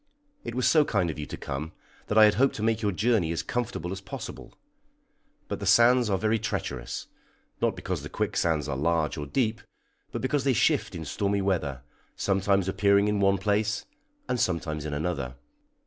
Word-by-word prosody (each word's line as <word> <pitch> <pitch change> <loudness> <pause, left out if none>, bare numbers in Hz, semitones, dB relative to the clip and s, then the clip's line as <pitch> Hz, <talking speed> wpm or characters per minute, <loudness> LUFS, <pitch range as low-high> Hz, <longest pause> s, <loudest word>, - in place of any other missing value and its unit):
It - - -5
was 130 -1 +2
so 150 +4 +5
kind 95 - 0
of 75 - -9
you 75 - -5
to - - -6
come, 75 +4 -5 0.3
that 105 - 0
I 110 - +9
had 105 - +5
hoped 135 +4 +2
to 105 - -4
make 115 0 +1
your 105 -2 +1
journey 100 -4 +1
as 85 - -2
comfortable 110 -8 -3
as 95 0 -5
possible; - - -8 0.9
but - - -4
the - - -4
sands 120 0 +5
are 95 - +2
very 110 +3 +1
treacherous, 95 - -4 0.6
not - - +2
because - - -3
the - - -7
quicksands 80 -3 0
are 70 - -2
large 80 +2 +1
or 75 -2 -5
deep, 115 - 0 0.5
but - - -4
because 130 +1 +1
they 135 -1 +3
shift 110 - +1
in 80 - -5
stormy 100 +3 0
weather, 75 -9 -1 0.3
sometimes 95 -1 +1
appearing 100 +1 +3
in 105 -1 0
one 100 0 +3
place, 105 +2 0 0.4
and 125 - -1
sometimes 80 -5 -1
in 75 - -3
another. 75 -5 -2
100 Hz, 190 wpm, -27 LUFS, 80-110 Hz, 0.9 s, I